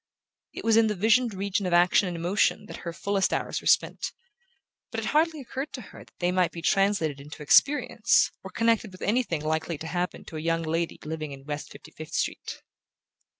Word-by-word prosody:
It - - -8
was 225 -1 +4
in 225 -1 +5
the 210 - -1
visioned 220 +3 +3
region 200 +1 -1
of 180 - -1
action 180 +3 +4
and 175 -1 -4
emotion 185 +4 +1
that - - -8
her 170 - -6
fullest 195 +3 0
hours - - -2
were - - -5
spent; - - +2 0.8
but 225 - -4
it 225 - -4
hardly 315 +4 +2
occurred 270 +2 -5
to 255 - -6
her - - -11
that - - -27
they 175 0 0
might 180 -1 +2
be 170 - -8
translated 180 -8 +1
into 150 +1 -10
experience, 280 - +4
or - - -7
connected 230 -2 +1
with 185 - -10
anything 210 -8 0
likely 160 +1 -1
to 160 - -8
happen 180 +2 -3
to 160 - -8
a - - -4
young 165 +1 0
lady 165 +1 -1
living 155 -2 -5
in 135 0 -12
West 150 0 -5
Fifty - - -13
fifth 155 +1 -8
Street. - - -3
180 Hz, 205 wpm, -27 LUFS, 160-220 Hz, 0.8 s, in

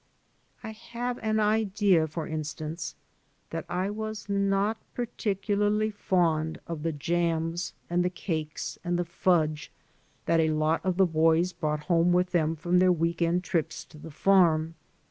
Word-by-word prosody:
I 220 - -5
have 240 +3 -5
an 220 0 +1
idea, 205 -5 +2
for 160 +1 -5
instance, 155 +1 -5 0.6
that 165 -1 -4
I 185 +3 -1
was 215 0 -5
not 200 +2 +1 0.2
par 245 - -1
ticularly 210 +1 0
fond 165 -5 0
of 165 -3 -5
the 165 +1 -1
jams 165 +1 -1
and 175 +1 +1
the 180 - +1
cakes 160 -4 -4
and 175 0 0
the 175 - -1
fudge 165 -3 0 0.5
that 165 - +3
a<lot 155 0 +2
of 185 -2 0
the 190 - +6
boys 165 +2 +2
brought 150 -1 -2
home 170 +1 +2
with 180 0 +2
them 160 -2 +1
from 175 +3 +1
their 185 0 +5
week 170 0 0
end 170 +2 +2
trips 165 -3 -2
to 155 - -15
the 160 - -9
farm. 165 -1 +3
175 Hz, 155 wpm, -28 LUFS, 160-195 Hz, 0.6 s, the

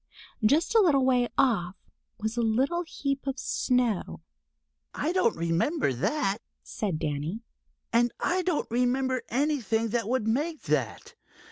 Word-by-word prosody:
Just 295 - +3
a 455 - +6
little 290 -10 +4
way 250 -2 +3
off 200 -10 +2 0.4
was 220 +1 -2
a 240 - 0
little 260 +10 +1
heap 280 -5 -3
of 270 0 -2
snow. 245 -6 0 0.7
"I 310 - -1
don't 365 - +2
remember 170 - +1
that," 205 - 0 0.2
said 195 -7 -3
Danny. 155 +9 -3 0.5
"And 240 +1 +3
I 370 +1 +1
don't 355 -3 0
remember 255 +2 +1
anything 240 -5 0
that 230 -1 -1
would 250 -3 0
make 300 +8 -1
that. - - -2
250 Hz, 135 wpm, -28 LUFS, 220-290 Hz, 0.7 s, a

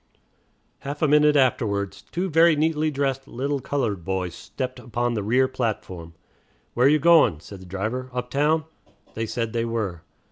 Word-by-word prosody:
'" - - -43 0.3
Half 145 +3 -5
a - - +5
minute 150 0 +5
afterwards 105 -7 +1
two 180 +2 -3
very 165 -1 +5
neatly 155 0 +1
dressed 135 -2 -2
little 140 +3 -2
colored 120 -9 -2
boys 95 -1 -2
stepped 130 +8 -6
upon 120 0 -2
the 110 - -1
rear 125 +6 +2
platform. 95 -10 -4 0.6
"Where 125 +2 +4
you 150 +2 +5
goin'?" 155 - +5
said 95 +3 -11
the - - -11
driver. 110 +8 -3
"Uptown?" 140 +6 0 0.5
They 115 0 -3
said 115 0 -3
they 115 -1 0
were. 110 -7 -3
125 Hz, 165 wpm, -24 LUFS, 105-145 Hz, 0.6 s, a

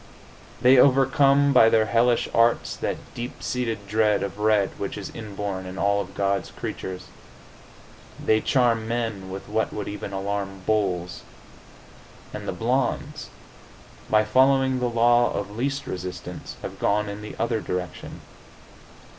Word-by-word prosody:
They 125 +1 +7
overcome 140 +1 +4
by 115 -3 +7
their 110 -1 +3
hellish 120 +2 +2
arts 115 +1 +2
that - - -5
deep 120 +1 -7
seated 115 -5 -3
dread 105 -1 +2
of 100 +1 -5
red 105 -2 +2
which 100 - -4
is 100 - -6
inborn 100 -3 -5
in 95 +1 -8
all 100 0 +2
of 95 0 -9
God's 100 -1 0
creatures. 95 -1 -6 1.2
They 110 0 +2
charm 115 -4 +2
men 115 -5 -3
with 95 +1 -7
what 110 +2 -1
would 105 -1 -5
even 100 -1 -6
alarm 100 -1 -4
bulls. 90 -5 -1 1.1
And - - -6
the - - -1
blondes, - - -2 0.8
by 110 0 +4
following 130 +3 +3
the 125 -1 0
law 120 +1 +3
of 100 +1 -4
least 140 +4 -2
resistance, 90 0 -6
have - - -7
gone 105 +1 +1
in 100 +1 -6
the 105 - -8
other 115 -1 -1
direction. 90 -1 -5
110 Hz, 140 wpm, -24 LUFS, 100-120 Hz, 1.2 s, They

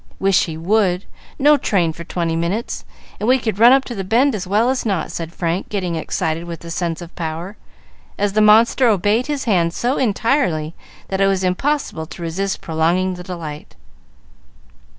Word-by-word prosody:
"Wish 195 -1 +3
he 160 -2 -6
would; 185 +1 +1 0.3
no 295 +1 +5
train 180 - +1
for 170 - -9
twenty 170 -1 -2
minutes, 175 +8 -2 0.3
and 215 - -1
we 260 - +6
could 220 -5 -3
run 235 +2 +8
up 270 0 +4
to 245 - -6
the 195 -4 -4
bend 245 +8 +2
as 190 -4 -4
well 215 +6 +2
as 260 - -2
not," 195 -7 -1
said 165 -1 -5
Frank, 170 +1 -2
getting 185 -5 -2
excited 160 +1 -2
with 170 -2 -7
the 170 - -8
sense 170 0 -2
of 170 - -13
power, 170 +4 -5 0.6
as 200 -1 0
the 215 - +3
monster 225 +4 +5
obeyed 210 +4 +2
his 290 -2 -2
hand 175 -7 +1
so 250 +3 0
entirely 210 - 0 0.4
that 190 0 -1
it 195 - +5
was 190 -1 +1
impossible 185 - -1
to 170 - -9
resist 190 +4 -2
prolonging 170 +4 0
the 180 - -8
delight. 165 -5 -8
190 Hz, 185 wpm, -19 LUFS, 170-225 Hz, 0.6 s, run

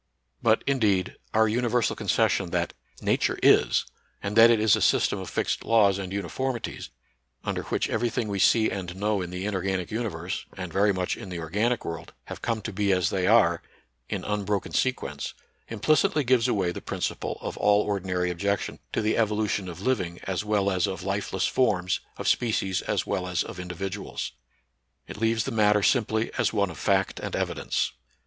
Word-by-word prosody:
But, - - +3
indeed, 105 -9 +1 0.2
our 110 0 +4
universal 120 +1 +1
concession - - +1
that - - -1 0.3
Nature - - +1
is, - - +5 0.4
and 100 +1 -3
that 115 +1 +9
it 115 -2 +4
is 110 -2 +5
a - - -3
system - - +3
of - - -6
fixed - - -1
laws 100 -4 +4
and 95 -2 -5
uniformities, 115 +6 -3 0.5
under - - -2
which - - 0
every 115 +2 0
thing 115 -1 -2
we 100 -1 -2
see 110 +3 +4
and 90 -2 -5
know 105 0 0
in 90 - -4
the 90 +2 -4
inorganic 95 -3 -2
universe, 95 -5 -3
and 90 -3 -6
very 100 +1 +4
much 90 -2 -1
in 95 - -9
the 90 - -5
organic 105 +9 -1
world, 80 0 -6
have - - -9
come 115 -3 -2
to 110 - -5
be 100 0 +1
as 90 -2 +2
they 95 -2 0
are, 100 -7 +4 0.5
in - - -3
unbroken 105 -1 -2
sequence, 75 - -1 0.3
implicitly 145 +6 +2
gives 125 -2 +3
away 95 -4 +1
the - - -7
principle - - -3
of - - -5
all 105 0 +4
ordinary 90 -3 -1
objec 100 +3 0
tion - - -6
to - - 0
the 110 - +2
evolution 105 -3 0
of 85 +1 -8
living 90 -8 -1
as 95 +1 -2
well 105 -2 +1
as 90 -1 +1
of 95 -1 -5
life 100 +1 -2
less 95 - 0
forms, 90 -8 +1 0.2
of - - -4
species 95 -5 +1
as 105 -3 -1
well 95 -2 -2
as 90 -1 0
of 100 - -8
individuals. 90 +1 -5 0.8
It - - -8
leaves 115 0 +2
the 135 - -4
matter 105 -2 +3
simply 110 -2 +2
as 115 -4 +2
one 100 -4 +1
of 80 - -10
fact 95 -1 +1
and - - -4
evidence. - - -1
100 Hz, 185 wpm, -26 LUFS, 90-110 Hz, 0.8 s, that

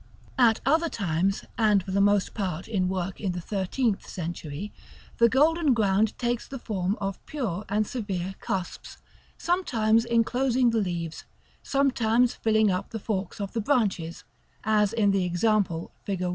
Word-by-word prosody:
At 230 -3 +5
other 320 +5 +3
times, 190 - -1
and 210 -4 +4
for 190 - -6
the 200 +1 +2
most 205 -1 +3
part 185 -5 -3
in 190 -5 0
work 185 0 -3
in 190 -4 -1
the 175 - -4
thirteenth 200 +4 -1
century, 170 +1 -5 0.5
the 235 0 +6
golden 300 +2 +3
ground 210 0 +2
takes 240 -1 -1
the 275 - -6
form 200 -4 -2
of 195 -1 -4
pure 215 - -3
and 210 +1 +1
severe 195 -6 -4
cusps, 185 -2 -4 0.4
sometimes 230 -11 +2
enclosing 240 +1 +2
the 225 -1 +1
leaves, 170 -4 -4 0.4
sometimes 250 -3 +2
filling 220 -2 +2
up 185 +2 -2
the 225 - -5
forks 200 -2 -3
of 200 -1 -4
the 230 - -1
branches 205 - 0 0.4
(as 210 -2 +2
in 215 -3 +2
the 195 -1 +1
example 180 -1 0
fig. 190 -2 -3
210 Hz, 155 wpm, -26 LUFS, 190-235 Hz, 0.5 s, the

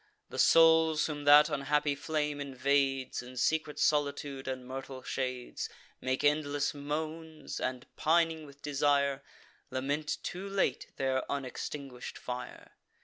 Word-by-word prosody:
The - - -6
souls 160 -1 +6
whom 145 -2 -4
that 145 +1 +8
unhappy 145 0 +1
flame 150 0 -2
invades, 135 -1 0
In 125 +1 -11
secret 155 +2 +1
solitude 140 -2 0
and 130 -1 -4
myrtle 130 0 -7
shades 125 -2 -3 0.3
Make 130 0 -1
endless 145 -1 +2
moans, 155 +2 -5
and, 130 -1 -3
pining 160 -1 +2
with 140 0 -16
desire, 140 -1 +2 0.5
Lament 140 +4 -1
too 190 +3 -5
late 195 -9 0
their 130 -1 +1
unextinguish'd 135 -1 -5
fire. 125 0 -7
145 Hz, 120 wpm, -31 LUFS, 135-150 Hz, 0.5 s, that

